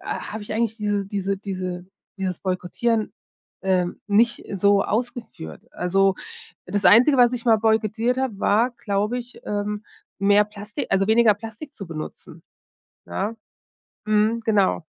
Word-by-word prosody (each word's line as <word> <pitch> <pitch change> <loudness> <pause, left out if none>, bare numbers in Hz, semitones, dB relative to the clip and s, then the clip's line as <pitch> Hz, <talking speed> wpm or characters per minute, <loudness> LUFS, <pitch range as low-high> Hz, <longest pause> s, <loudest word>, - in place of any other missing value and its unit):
habe 215 0 -5
ich 205 - -6
eigentlich 225 0 0
diese 205 -2 -1
diese 195 -1 -2
diese 185 -2 -5 0.3
dieses 185 -2 -3
Boykottieren, 200 +5 -1 0.5
ähm, 180 -2 0
nicht 230 +4 +3
so 200 +1 +4
ausgeführt. 230 - -4
Also 195 +2 +2 0.5
das 200 +2 -2
Einzige, 255 +6 +7
was 245 0 +5
ich 245 -1 -4
mal 225 -2 +5
boykottiert 220 +2 +1
habe, 245 -7 -2
war, 230 +5 +3
glaube 210 +2 -1
ich, 245 0 -9
ähm, 210 0 -3 0.3
mehr 205 +1 +4
Plastik 210 0 -6
also, 195 0 +2
weniger 220 -1 +5
Plastik 225 +7 -9
zu 195 - -8
benutzen, 155 -2 -8 0.6
ne? 90 - -3 0.7
Mhm, 215 +2 +2
genau. 200 -6 +2
210 Hz, 135 wpm, -23 LUFS, 195-230 Hz, 0.7 s, Einzige